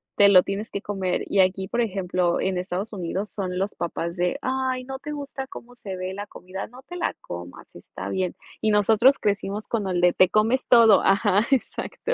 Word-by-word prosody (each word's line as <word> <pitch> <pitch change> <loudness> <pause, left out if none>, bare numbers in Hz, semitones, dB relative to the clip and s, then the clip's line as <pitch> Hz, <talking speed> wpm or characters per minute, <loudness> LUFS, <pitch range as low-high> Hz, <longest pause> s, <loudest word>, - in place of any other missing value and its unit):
te 200 0 +6
lo 185 -2 +7
tienes 200 +3 -4
que 200 - -4
comer. 190 -4 -2
Y 200 - 0
aquí, 190 +1 +1
por 240 +5 0
ejemplo, 185 -4 0
en 190 -1 -1
Estados 185 +4 -4
Unidos 190 +2 -3
son 185 -2 -4
los 195 +1 -2
papás 170 0 -3
de: 180 -1 0
"Ay, 260 -1 -1
¿no 265 0 -6
te 300 - -7
gusta 280 -2 -5
cómo 245 -1 -11
se 195 -6 -7
ve 185 +1 -4
la 205 +1 -5
comida? 185 +1 -8
No 255 +3 -15
te 355 - -10
la 350 - -1
comas, 90 +1 -10
está - - -9
bien". 185 -2 -1 0.3
Y 215 - +2
nosotros 220 +6 +4
crecimos 205 +1 -2
con 215 -4 -1
el 180 -1 0
de 175 0 +4
"Te 185 - +5
comes 225 +6 +2
todo". 230 -4 +7
Ajá, 200 +2 +3
exacto. 275 - -1
200 Hz, 210 wpm, -24 LUFS, 185-235 Hz, 0.3 s, lo